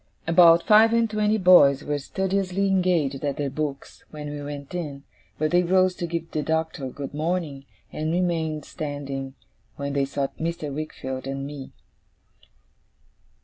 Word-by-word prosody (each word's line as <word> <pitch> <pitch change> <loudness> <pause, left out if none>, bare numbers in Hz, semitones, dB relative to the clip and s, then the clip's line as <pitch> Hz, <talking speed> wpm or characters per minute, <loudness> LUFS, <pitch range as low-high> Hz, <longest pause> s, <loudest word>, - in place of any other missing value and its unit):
About 170 0 +6
five 220 +1 +6
and 230 0 +3
twenty 215 0 +1
boys 175 -8 +6
were 145 -1 -2
studiously 190 +4 -1
engaged 175 -8 +1
at 140 -2 -1
their 140 -2 -2
books 140 -1 -5
when 150 -1 -7
we 145 0 -6
went 145 +1 -7
in, 145 -6 -5 0.3
but 155 0 0
they 175 0 +4
rose 185 +1 +3
to 175 - -3
give 165 0 -4
the 155 - -1
Doctor 160 -3 -2
good 140 +2 -7
morning, 155 -3 -2 0.3
and 155 +1 -2
remained 165 -4 -1
standing 140 -3 -5 0.4
when 140 0 -4
they 140 -1 +1
saw 140 0 -2
Mr. 160 -3 -3
Wickfield 130 -3 -5
and 135 0 -4
me. 140 -2 -8
155 Hz, 150 wpm, -24 LUFS, 140-180 Hz, 0.4 s, About